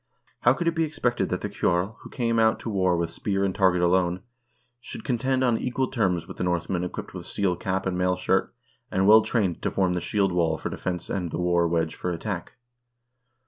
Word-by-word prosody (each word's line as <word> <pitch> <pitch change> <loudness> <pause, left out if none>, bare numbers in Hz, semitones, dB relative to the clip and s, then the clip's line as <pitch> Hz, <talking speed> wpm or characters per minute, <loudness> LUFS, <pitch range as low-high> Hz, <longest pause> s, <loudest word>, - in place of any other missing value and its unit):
How 120 - +5
could 170 +6 -3
it 170 - +3
be 165 0 +1
expected 135 -6 -1
that - - -2
the - - -2
ceorl, 90 +5 0
who - - -12
came 115 -3 0
out 110 0 +4
to 115 - -4
war 95 -3 +2
with 85 -1 -1
spear 100 +2 -1
and 95 - -1
target 95 -3 +3
alone, 90 0 +2 0.6
should - - -9
contend 130 +1 0
on 120 -3 +2
equal 130 +1 -1
terms 90 -9 0
with - - -9
the - - -2
Northmen 90 0 -1
equipped 90 - -6
with - - -7
steel 95 -3 0
cap 95 +2 -2
and 95 -1 -1
mail 90 0 +2
shirt, 95 +1 0 0.4
and 95 +1 +1
well 110 +1 +9
trained 100 -8 -1
to - - 0
form 95 -2 +1
the 90 - -1
shield 100 0 +1
wall 85 -3 +1
for - - -5
defense 90 -2 -4
and 90 -3 -2
the - - -4
war 85 -1 +2
wedge 80 -1 0
for 90 - -4
attack? 85 +1 -4
95 Hz, 220 wpm, -26 LUFS, 90-110 Hz, 0.6 s, well